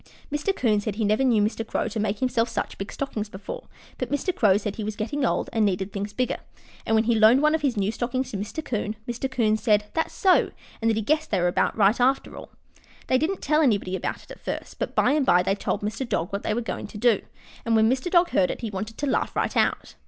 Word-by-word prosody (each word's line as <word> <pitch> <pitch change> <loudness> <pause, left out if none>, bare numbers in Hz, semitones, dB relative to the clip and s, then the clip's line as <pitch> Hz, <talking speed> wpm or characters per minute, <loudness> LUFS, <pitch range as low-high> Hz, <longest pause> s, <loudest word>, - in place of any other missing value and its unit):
Mr. 295 +7 0
'Coon 215 -4 +2
said 205 -1 -3
he 220 0 0
never 215 +6 +2
knew 230 -5 +3
Mr. 220 +2 -1
Crow 225 - -2
to 220 0 -4
make 210 -1 0
himself 245 -2 +1
such 210 - -3
big 195 - -5
stockings 220 -6 -4
before, 480 - -8 0.3
but - - -2
Mr. 345 +6 -1
Crow 205 -5 +4
said 205 -1 -4
he 220 - -3
was 215 0 -3
getting 275 +8 -2
old 240 - +1
and 225 -1 +2
needed 195 -1 0
things 205 +1 -3
bigger, 255 +3 -1 0.5
and 225 - +3
when 220 - +4
he 235 +1 +2
loaned 225 +3 +6
one 305 0 +4
of 320 - +1
his 265 -6 0
new 200 +1 +1
stockings 255 +3 -2
to 205 - -3
Mr. 210 +11 -5
'Coon, 215 -2 -2
Mr. 240 +2 -3
'Coon 230 -5 +2
said, 210 -2 +2
"That's 320 - -1
so," 375 -2 +4 0.3
and 225 - +2
that 220 - +1
he 220 - -1
guessed 310 +7 +1
they 195 - +1
were 175 - +2
about 175 - +1
right 210 +2 +4
after 265 +2 +1
all. - - -10 0.6
They 255 - +2
didn't 355 +6 -1
tell 305 +1 +3
anybody 200 -9 +1
about - - -4
it - - -15
at - - -10
first, - - -6
but - - -3
by - - +4
and 295 0 +2
by 180 -8 +4
they 195 - +1
told 200 0 -2
Mr. 215 +4 -3
Dog 170 - -1
what 200 - -1
they 215 - -1
were 240 - -1
going 225 - -5
to - - -10
do, 230 -1 +3 0.4
and 230 -1 +1
when 220 0 +5
Mr. 260 +7 0
Dog 345 0 +4
heard 180 - +3
it - - -4
he 225 -3 -4
wanted 210 +3 -5
to 290 - -2
laugh 270 - 0
right - - -1
out. - - +1
225 Hz, 265 wpm, -25 LUFS, 210-265 Hz, 0.6 s, loaned